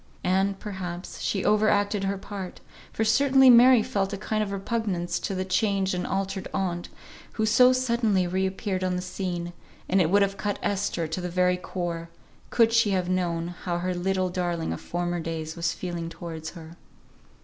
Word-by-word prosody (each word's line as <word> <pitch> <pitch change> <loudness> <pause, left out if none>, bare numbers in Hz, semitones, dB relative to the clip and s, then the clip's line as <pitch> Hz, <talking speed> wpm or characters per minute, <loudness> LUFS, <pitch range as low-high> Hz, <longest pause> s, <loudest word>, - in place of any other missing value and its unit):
And, 190 +2 +1
perhaps, 185 -3 -6
she 195 - -1
overacted 205 -1 +2
her 195 0 -1
part, 195 -2 -7 0.3
for 220 - -1
certainly 265 +3 +6
Mary 245 -1 +7
felt 195 -2 -1
a 200 - -3
kind 215 +2 -2
of 205 -2 -2
repugnance 195 -4 -2
to 195 - -3
the 185 0 -2
changed 190 0 +1
and 180 0 -2
altered 195 0 -2
aunt, 175 -2 -2 0.4
who 220 - 0
so 250 +3 +6
suddenly 235 -7 +1
re 190 +2 0
appeared 190 -1 -3
on 185 -1 0
the 180 - -2
scene; 180 -2 -4 0.3
and 190 +1 +3
it 160 - +2
would 200 +2 +5
have 200 0 -2
cut 205 +1 -2
Esther 200 -4 -1
to 160 +4 -4
the 180 - -3
very 180 +1 +2
core, 175 -2 -4 0.4
could 230 -1 +3
she 230 -2 +4
have 185 -2 0
known 175 -2 -1
how 175 0 -4
her 180 +1 -1
little 185 +1 0
darling 175 - -2
of 80 - -7
former 175 0 -2
days 160 -1 -4
was 170 -1 0
feeling 175 -2 -5
towards 160 -2 -7
her. 165 +1 -11
185 Hz, 180 wpm, -26 LUFS, 175-205 Hz, 0.4 s, Mary